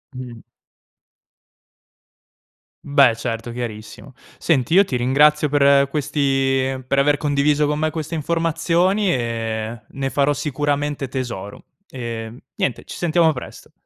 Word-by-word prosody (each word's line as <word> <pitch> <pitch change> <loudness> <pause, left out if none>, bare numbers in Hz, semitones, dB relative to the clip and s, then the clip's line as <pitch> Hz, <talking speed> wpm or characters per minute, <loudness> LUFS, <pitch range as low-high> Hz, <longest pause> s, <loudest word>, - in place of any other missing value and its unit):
Mh. 125 -3 -9 2.4
Beh 140 -4 +4
certo, 115 0 -4
chiarissimo. 115 +2 -7 0.2
Senti, 145 -2 +1
io 195 +2 +7
ti 130 -9 -3
ringrazio 150 +5 +3
per 140 -1 +4
questi 135 -2 0
per 140 +1 +1
aver 145 +1 +3
condiviso 145 0 +1
con 150 +1 -1
me 155 0 +1
queste 160 0 -5
informazioni 170 +5 +1
e 115 -3 -3
ne 135 0 -4
farò 145 +1 +1
sicuramente 145 -1 -2
tesoro, 120 -6 -6 0.3
ehm, 115 -2 -6 0.2
niente 130 - -2
ci - - -9
sentiamo 165 -1 +3
presto. 125 - -9
140 Hz, 115 wpm, -21 LUFS, 125-150 Hz, 2.4 s, io